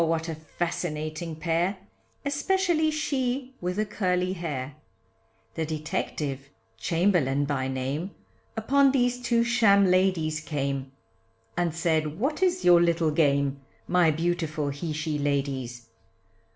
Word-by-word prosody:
what 165 0 0
a 165 - -2
fascinating 155 0 -4
pair, 170 +4 0 0.5
Especially 315 +3 +1
she 265 -4 -1
with 180 +1 -2
the 215 +1 0
curly 185 -3 0
hair. 145 -6 -4 0.8
The 160 - -2
detective, 150 -3 -3 0.3
Chamberlain 165 - +2
by 135 -2 -1
name. 135 +7 -2 0.5
Upon 275 +5 +4
these 245 -2 +1
two 235 -1 +2
sham 225 -5 +4
ladies 180 -4 +2
came, 140 -3 -3 0.6
And 175 -1 +1
said 160 -1 0
what 290 - -1
is 365 -1 +2
your 175 -1 +7
little 170 -2 +2
game, 140 -3 +2 0.3
My 175 -2 +4
beautiful 160 -2 -1
he 145 +4 -4
she 155 0 -2
ladies. 135 -4 -2
165 Hz, 120 wpm, -27 LUFS, 150-200 Hz, 0.8 s, your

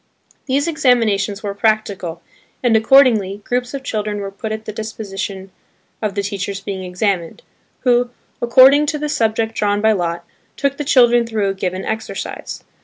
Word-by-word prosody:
These 280 +3 +1
examinations 225 -9 +1
were 200 -1 -3
practical, 200 -5 -1 0.4
and, 240 -2 +3
accordingly, 220 -4 +4
groups 245 +3 -2
of 270 - -6
children 210 -4 -2
were 200 -1 -5
put 215 +2 -6
at 220 0 -5
the 215 - -4
disposition 200 -3 -6 0.5
of 210 -3 -2
the 200 - -1
teachers 200 -1 -3
being 195 -1 -5
examined, 180 - -2 0.4
who, 245 -1 +2 0.3
according 265 +5 +6
to 300 - 0
the 300 0 -3
subject 225 -3 0
drawn 205 -2 0
by 220 +1 +3
lot, 170 -4 -2 0.3
took 280 0 0
the 295 - -3
children 240 -4 +4
through 215 -3 0
a - - -1
given 185 -1 -3
exercise. 220 0 -5
215 Hz, 160 wpm, -18 LUFS, 195-245 Hz, 0.5 s, according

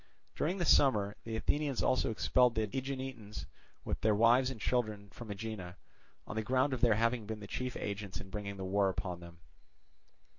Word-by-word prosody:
During 175 +5 0
the 175 - 0
summer 105 -9 +4
the 115 -1 -3
Athenians 145 +3 0
also 130 - +2
expelled 125 +2 +3
the 110 -1 +1
Aeginetans 130 -5 -4 0.4
with - - -2
their 110 -1 +3
wives 120 +4 +5
and 130 -4 -6
children 105 -3 -1
from 120 -3 -10
Aegina, 100 -4 -5 0.5
on - - -6
the 110 - +1
ground 130 +5 +2
of 130 - -3
their 115 -4 +5
having 115 0 +1
been 110 -1 -4
the 100 - -8
chief 125 +5 -3
agents 100 -1 -4
in 95 - -10
bringing 100 -2 -4
the 95 - -4
war 100 +1 +2
upon 90 -1 -3
them. 85 0 -13
110 Hz, 185 wpm, -33 LUFS, 100-125 Hz, 0.5 s, wives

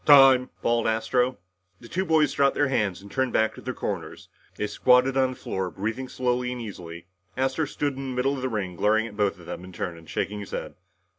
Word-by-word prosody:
"Time!" 135 -3 +7
bawled 115 0 +2
Astro. 120 +3 +1 0.4
The 120 - -12
two 185 +9 -1
boys 155 -4 +3
dropped 140 -1 +3
their 145 - +2
hands 100 -7 0
and 100 - -12
turned 130 -2 0
back 110 0 +2
to - - -11
their - - -4
corners. - - -5 0.3
They - - -2
squatted 125 +5 +4
on 130 -1 +3
the 130 - -6
floor 95 -5 -3
breathing 115 +8 -4
slowly 125 -1 0
and 125 - -5
easily. 85 -7 -8 0.3
Astro 135 +4 +1
stood 145 -1 -2
in 135 0 -5
the 130 - -4
middle 130 +2 +1
of 130 - -5
the 130 - -1
ring, 100 -6 -3
glaring 110 +5 +2
at 110 -3 -9
both 100 -2 +1
of 85 - -14
them 90 +1 -6
in 95 - -10
turn 85 -1 -4
and 80 -3 -16
shaking 105 +1 -2
his 100 - -7
head. - - -5
125 Hz, 230 wpm, -26 LUFS, 105-130 Hz, 0.4 s, Time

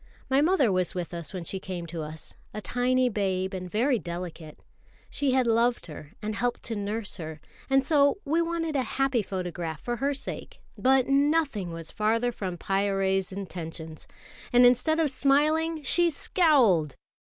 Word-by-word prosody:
My 270 +1 +4
mother 305 - +3
was 185 -1 0
with 175 -1 -4
us 170 -2 -4
when 185 -3 -5
she 190 +3 -4
came 185 -3 -6
to 165 -1 -6
us, 155 0 -8 0.2
a - - -3
tiny 250 +3 +1
babe 190 -4 -1
and 185 -1 -5
very 240 +5 +1
delicate. 170 -3 -7 0.5
She 275 -3 +1
had 260 -1 +3
loved 235 +1 +2
her 150 -2 -10
and 215 +1 -2
helped 240 +4 -2
to 225 - -3
nurse 205 +1 -3
her, 155 -2 -7 0.3
and 270 0 +4
so 285 +2 +4
we 320 +4 +2
wanted 330 -2 -2
a 270 - +2 0.2
happy 270 -3 +2
photograph 175 -5 -4
for 240 +6 -3
her 280 +4 0
sake; 270 - -7 0.2
but 260 0 +3
nothing 275 - +1
was 165 -1 -7
further 225 +3 +1
from 185 -6 -5
Pyârie's 195 0 0
intentions, 165 -4 -7 0.4
and 245 0 +6
instead 250 +7 +4
of 310 -4 +2
smiling, 305 +4 +2
she 345 +5 +3
scowled. 255 - +3
220 Hz, 165 wpm, -27 LUFS, 180-275 Hz, 0.5 s, and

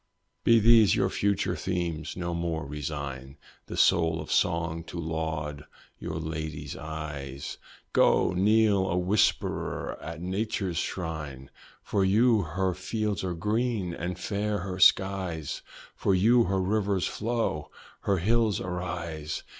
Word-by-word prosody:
Be 115 - +6
these 110 -1 +6
your - - +1
future 100 -2 0
themes 85 -2 -3
no 85 -1 -2
more 85 -2 -2
resign 70 -2 -5 0.3
The - - -6
soul 80 -1 +4
of 75 - -6
song 85 0 +1
to 85 - -8
laud 80 -2 -3 0.3
your 80 -2 -5
lady's 80 -1 -4
eyes; 75 -3 -6 0.3
Go! - - +4
kneel 100 0 +3
a 90 - 0
worshipper 95 +4 +1
at 80 +1 -6
nature's 95 -1 -2
shrine! 75 -8 -5 0.3
For 100 - +1
you 110 +3 +4
her 90 +3 -1
fields 105 +3 -2
are 90 -2 -2
green, 105 0 -1
and 85 +1 -4
fair 105 +2 -1
her 95 0 -5
skies! 95 -5 +3 0.3
For 95 - +2
you 115 +6 +5
her 95 +1 0
rivers 100 -1 +1
flow, 115 -9 -2 0.3
her 100 - +1
hills 110 +3 +2
arise! 85 -4 -4
90 Hz, 130 wpm, -28 LUFS, 80-100 Hz, 0.3 s, Be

